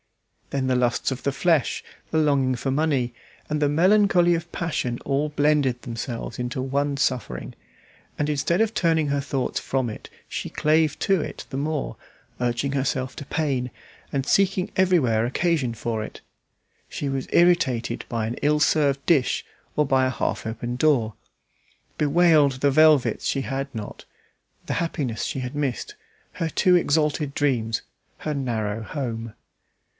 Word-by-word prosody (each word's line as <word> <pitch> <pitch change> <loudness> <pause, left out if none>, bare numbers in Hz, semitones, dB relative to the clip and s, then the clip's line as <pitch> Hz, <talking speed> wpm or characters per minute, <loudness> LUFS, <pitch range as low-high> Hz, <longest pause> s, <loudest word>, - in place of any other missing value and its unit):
Then 135 -1 -1
the 130 - +2
lusts 125 +1 +1
of 130 - -5
the 140 - +1
flesh, 160 -1 +1 0.3
the 160 - 0
longing 140 -4 +2
for 135 +3 -2
money, 135 -4 +1 0.4
and 150 0 -1
the 145 - +3
melancholy 180 +2 +4
of 170 0 -3
passion 130 -7 -2
all 140 +2 0
blended 145 -4 +1
themselves 115 0 -5
into 125 +1 -2
one 140 +2 -1
suffering, 130 -4 -2 0.6
and 150 - 0
instead 150 +4 +1
of 225 0 +1
turning 160 -5 +2
her 140 0 +1
thoughts 135 -2 -2
from 130 -3 -1
it, - - -10 0.2
she - - -4
clave 155 0 +2
to 195 -4 +2
it - - -6
the - - -5
more, 150 +1 -2 0.5
urging 120 +3 0
herself 130 -1 -1
to 145 - -6
pain, 135 -5 -1 0.4
and 135 -2 -1
seeking 195 +2 +2
everywhere 145 -13 +3
occasion 140 -1 0
for 110 -1 -3
it. - - -9 0.7
She 145 - -4
was 135 -1 -2
irritated 130 -9 +2
by 115 -3 -1
an 115 +2 -3
ill 150 +1 +3
served 145 -2 +2
dish 145 -7 +2 0.3
or 150 - +4
by 130 -1 +3
a - - +1
half 130 - -2
open 120 +2 -4
door; 125 -6 +2 0.8
bewailed 150 -2 +4
the 140 +2 +1
velvets 155 -2 +4
she 135 - 0
had 135 +1 -4
not, 110 -3 -7 0.6
the - - -2
happiness 140 -9 -2
she - - -3
had 125 +2 -5
missed, 145 - -2 0.4
her 165 -2 -2
too 180 +3 +3
exalted 150 -3 +1
dreams, 120 -6 0 0.3
her 155 - -3
narrow 115 -6 -2
home. 115 -3 -5
140 Hz, 155 wpm, -24 LUFS, 125-155 Hz, 0.8 s, melancholy